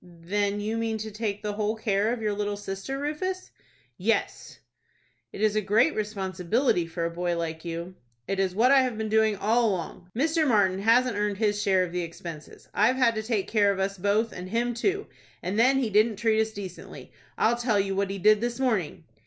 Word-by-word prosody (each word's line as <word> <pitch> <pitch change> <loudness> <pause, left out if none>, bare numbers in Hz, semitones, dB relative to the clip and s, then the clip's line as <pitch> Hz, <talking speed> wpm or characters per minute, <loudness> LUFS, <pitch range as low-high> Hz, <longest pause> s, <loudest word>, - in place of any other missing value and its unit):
"Then 200 +4 -2
you 215 +2 -2
mean 225 -1 -1
to 220 0 -6
take 210 -1 -3
the 210 -1 -2
whole 210 +1 -1
care 215 0 0
of 240 -2 -3
your 210 -1 0
little 205 0 -2
sister, 195 +6 -5
Rufus?" 310 +6 -3 0.5
"Yes." - - -1 0.7
"It - - -8
is 215 -1 +2
a 215 - +2
great 220 +10 +3
responsibility 195 -1 0
for 165 0 -3
a 170 - -2
boy 175 0 -2
like 160 -1 -4
you." 170 +1 -5 0.3
"It 195 - -2
is 190 -1 0
what 240 +5 +4
I 275 -1 +7
have 250 -4 -2
been 220 0 -3
doing 220 -1 +3
all 225 +4 +2
along. 180 -1 -5
Mr. 315 +3 +2
Martin 195 -6 +3
hasn't 230 +2 +3
earned 205 -1 -1
his 210 -1 +1
share 190 -3 +3
of 180 - -4
the 180 0 -2
expenses. 165 -2 -9
I've 245 +4 +3
had 250 -3 +3
to 220 - -2
take 220 -3 -1
care 205 -2 +3
of 195 - -3
us 195 0 -2
both, 205 +4 +1
and 180 +1 -7
him 240 +3 0
too, 395 - -1 0.4
and 195 +4 -1
then 260 +3 +5
he 245 -5 0
didn't 215 +2 +3
treat 220 +1 +2
us 220 - 0
decently. 195 -4 -9 0.3
I'll 230 +2 +3
tell 235 -4 +1
you 195 0 -1
what 200 0 0
he 195 - -4
did 210 +2 +4
this 240 +1 -2
morning." 215 - -1
210 Hz, 210 wpm, -26 LUFS, 190-230 Hz, 0.7 s, I